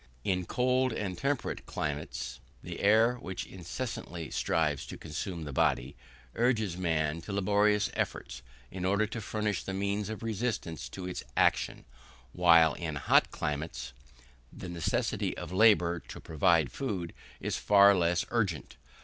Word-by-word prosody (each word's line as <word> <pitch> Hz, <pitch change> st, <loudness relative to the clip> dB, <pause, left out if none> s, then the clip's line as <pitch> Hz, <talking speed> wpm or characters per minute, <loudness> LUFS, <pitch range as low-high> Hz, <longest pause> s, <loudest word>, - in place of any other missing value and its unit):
In 90 Hz, -2 st, 0 dB
cold 130 Hz, 0 st, +2 dB
and 95 Hz, -4 st, -3 dB
temperate 140 Hz, +7 st, -2 dB
climates, 70 Hz, -4 st, -4 dB, 0.2 s
the -, -, -6 dB
air, 110 Hz, +4 st, +4 dB
which 95 Hz, -6 st, -5 dB
incessantly 90 Hz, -, -6 dB
strives 75 Hz, -4 st, 0 dB
to -, -, -7 dB
consume 85 Hz, +2 st, -5 dB
the 75 Hz, -2 st, -6 dB
body, 65 Hz, +1 st, +1 dB, 0.4 s
urges 110 Hz, -6 st, +1 dB
man 80 Hz, -3 st, 0 dB
to 100 Hz, -, -7 dB
laborious 105 Hz, +1 st, +2 dB
efforts -, -, -3 dB, 0.3 s
in 90 Hz, -1 st, -5 dB
order 100 Hz, +3 st, +2 dB
to 115 Hz, +2 st, -5 dB
furnish 105 Hz, -1 st, -2 dB
the 95 Hz, -, -4 dB
means 100 Hz, +1 st, -1 dB
of 110 Hz, +1 st, -6 dB
resistance 105 Hz, -, -3 dB
to 90 Hz, +6 st, -6 dB
its 90 Hz, -, -5 dB
action, -, -, +2 dB, 0.5 s
while, 85 Hz, -3 st, +6 dB
in 80 Hz, -3 st, -4 dB
hot 70 Hz, -, +3 dB
climates, 70 Hz, -5 st, -4 dB, 0.6 s
the 90 Hz, -, -8 dB
necessity 85 Hz, -2 st, -1 dB
of -, -, -6 dB
labour 95 Hz, -4 st, +4 dB
to -, -, -8 dB
provide 80 Hz, -1 st, +2 dB
food 95 Hz, -11 st, -3 dB, 0.3 s
is -, -, -2 dB
far 100 Hz, 0 st, +6 dB
less 85 Hz, -1 st, +1 dB
urgent. 105 Hz, -9 st, -1 dB
90 Hz, 140 wpm, -30 LUFS, 80-105 Hz, 0.6 s, while